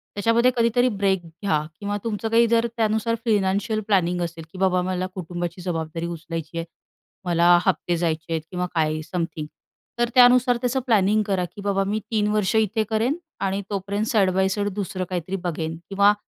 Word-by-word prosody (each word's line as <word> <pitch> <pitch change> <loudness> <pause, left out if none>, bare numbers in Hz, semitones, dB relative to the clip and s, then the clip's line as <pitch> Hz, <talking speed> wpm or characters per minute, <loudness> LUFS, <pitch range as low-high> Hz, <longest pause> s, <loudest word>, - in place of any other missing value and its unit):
त्याच्यामध्ये 230 +4 +3
कधीतरी 240 +2 +3
ब्रेक 195 -3 0
घ्या 165 -1 -1 0.2
किंवा 205 0 -2
तुमचं 225 0 -2
काही 230 +1 +4
जर 230 0 +2
त्यानुसार 220 +1 +1
फायनान्शियल 205 0 +1
प्लॅनिंग 180 -3 +2
असेल, 165 -1 -4
की - - -11
बाबा 185 -1 +2
मला 185 0 -2
कुटुंबाची 175 0 -5
जबाबदारी 165 -2 -3
उचलायची 165 -1 -6
आहे, 165 - -2 0.6
मला 175 0 +5
हफ्ते 175 -2 +1
जायचे 165 -1 -2
आहेत 160 - -1
किंवा 180 -1 -1
काय 155 -1 +1
समथिंग. 165 -3 -3 0.5
तर 240 - +2
त्यानुसार 245 0 +6
त्याचं 250 +1 0
प्लॅनिंग 215 -2 +3
करा, 195 -3 0
की 200 - -11
बाबा 195 -1 +1
मी 210 +2 -1
3 210 -2 +2
वर्ष 210 -1 +1
इथे 220 0 +2
करेन 225 +6 +1 0.2
आणि 195 +1 -1
तोपर्यंत 200 +1 -2
साइड 215 -7 +3
बाय 190 0 +2
साइड 205 +1 -1
दुसरं 190 -2 -3
काहीतरी 185 +1 -3
बघेन 165 -2 -3
किंवा 200 +1 +5
195 Hz, 175 wpm, -23 LUFS, 175-215 Hz, 0.6 s, त्यानुसार